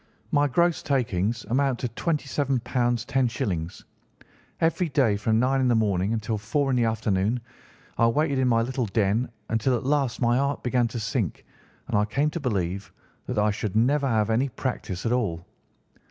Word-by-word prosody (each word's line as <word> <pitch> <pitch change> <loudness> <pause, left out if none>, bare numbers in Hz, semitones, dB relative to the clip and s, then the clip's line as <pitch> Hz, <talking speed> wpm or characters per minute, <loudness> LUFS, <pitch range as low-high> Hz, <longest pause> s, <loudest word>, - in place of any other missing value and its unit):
My 145 0 +3
gross 170 +4 +2
takings 120 - -1
amount 130 +3 +1
to 125 - 0
£ 115 - -14
27 140 -4 -1
10_s_. 120 -7 -1 0.8
Every 165 +1 +1
day, 130 -8 +2
from 110 +2 +1
nine 135 +2 +2
in 130 - +2
the 120 - +3
morning 100 -3 +1
until 110 -1 -2
four 135 +6 0
in - - +2
the 120 -2 +2
afternoon, 110 0 0 0.6
I 115 - +5
waited 140 +3 +1
in 130 - +2
my 115 -2 +3
little 125 -1 -2
den, 105 +3 +1 0.2
until 120 +3 +1
at 110 - -6
last 140 -3 +1
my 120 -1 +3
heart 140 +1 -1
began 125 -1 +2
to 115 +1 -5
sink, 110 - -2 0.4
and - - -2
I 105 0 +3
came 140 +8 0
to 170 - -4
believe 100 - -2 0.4
that 125 - -3
I 105 0 +3
should 105 -1 -4
never 135 +5 +3
have 110 -3 +1
any 125 +5 +1
practice 110 -7 -4
at 115 - +1
all. 95 -9 -1
120 Hz, 180 wpm, -25 LUFS, 110-135 Hz, 0.8 s, I